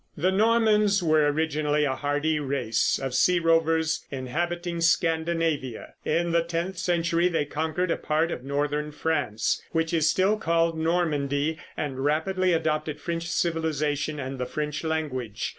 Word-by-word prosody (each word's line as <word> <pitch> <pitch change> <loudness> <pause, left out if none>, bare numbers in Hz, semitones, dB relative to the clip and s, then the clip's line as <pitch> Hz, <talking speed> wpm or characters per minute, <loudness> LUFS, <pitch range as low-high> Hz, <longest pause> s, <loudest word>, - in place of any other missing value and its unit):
The 180 +5 +2
Normans 210 -1 +3
were 155 -2 +3
originally 150 -1 0
a 135 - 0
hardy 145 +3 0
race 130 -6 0
of 135 -1 -4
sea 180 +8 +4
rovers 165 -1 +2
inhabiting 170 +6 -3
Scandinavia. 165 -6 0
In 170 +2 0
the 170 0 +3
tenth 170 +2 -3
century 170 -1 +1
they 165 -4 0
conquered 160 +4 -2
a - - +1
part 155 +2 0
of 125 - -5
northern 145 +2 -1
France, 145 -8 -1
which 165 0 0
is 160 -2 +3
still 195 +5 +2
called 165 -4 +1
Normandy, 160 -2 0 0.2
and 135 -3 -3
rapidly 185 +5 +1
adopted 155 -2 -1
French 170 0 -3
civilization 155 -3 -1
and 135 0 -5
the 125 - -2
French 150 +2 -3
language. 130 -9 -2
160 Hz, 140 wpm, -26 LUFS, 145-170 Hz, 0.2 s, sea